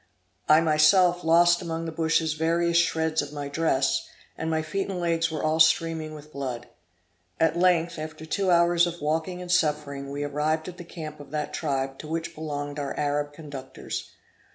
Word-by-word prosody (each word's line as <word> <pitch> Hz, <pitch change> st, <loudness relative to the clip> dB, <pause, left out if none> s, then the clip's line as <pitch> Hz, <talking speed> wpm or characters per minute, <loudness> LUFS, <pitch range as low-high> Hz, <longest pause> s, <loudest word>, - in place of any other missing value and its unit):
I 155 Hz, +1 st, +7 dB
myself 170 Hz, +3 st, +4 dB
lost 170 Hz, +2 st, +5 dB
among 165 Hz, -1 st, -4 dB
the 165 Hz, -, -4 dB
bushes 160 Hz, 0 st, +1 dB
various 170 Hz, +2 st, +1 dB
shreds 160 Hz, -2 st, +2 dB
of 145 Hz, 0 st, -7 dB
my 145 Hz, -1 st, -5 dB
dress, 140 Hz, -3 st, +1 dB, 0.3 s
and 160 Hz, -, -3 dB
my 160 Hz, -1 st, 0 dB
feet 195 Hz, +6 st, -3 dB
and 185 Hz, -2 st, -3 dB
legs 165 Hz, -1 st, +1 dB
were 160 Hz, -1 st, -4 dB
all 155 Hz, +1 st, +1 dB
streaming 160 Hz, -1 st, +3 dB
with 150 Hz, 0 st, -12 dB
blood. 130 Hz, -3 st, -5 dB, 0.7 s
At 160 Hz, 0 st, +3 dB
length, 170 Hz, -2 st, +2 dB
after 155 Hz, 0 st, -7 dB
two 195 Hz, +4 st, -1 dB
long 180 Hz, -, +5 dB
hours 175 Hz, 0 st, +3 dB
of 170 Hz, 0 st, -5 dB
walking 160 Hz, +4 st, -2 dB
and 175 Hz, -, -5 dB
suffering, 145 Hz, -5 st, 0 dB
we 145 Hz, +1 st, -4 dB
arrived 150 Hz, +2 st, -1 dB
at 180 Hz, -1 st, -8 dB
the 175 Hz, -, -8 dB
camp 155 Hz, -3 st, -8 dB
of 145 Hz, -, -11 dB
that 150 Hz, 0 st, -3 dB
tribe 135 Hz, -3 st, -2 dB
to 155 Hz, -, -8 dB
which 165 Hz, +1 st, -3 dB
belonged 145 Hz, -2 st, -5 dB
our 140 Hz, -1 st, -4 dB
Arab 145 Hz, 0 st, -1 dB
conductors. 145 Hz, -4 st, -7 dB
160 Hz, 185 wpm, -26 LUFS, 150-170 Hz, 0.7 s, I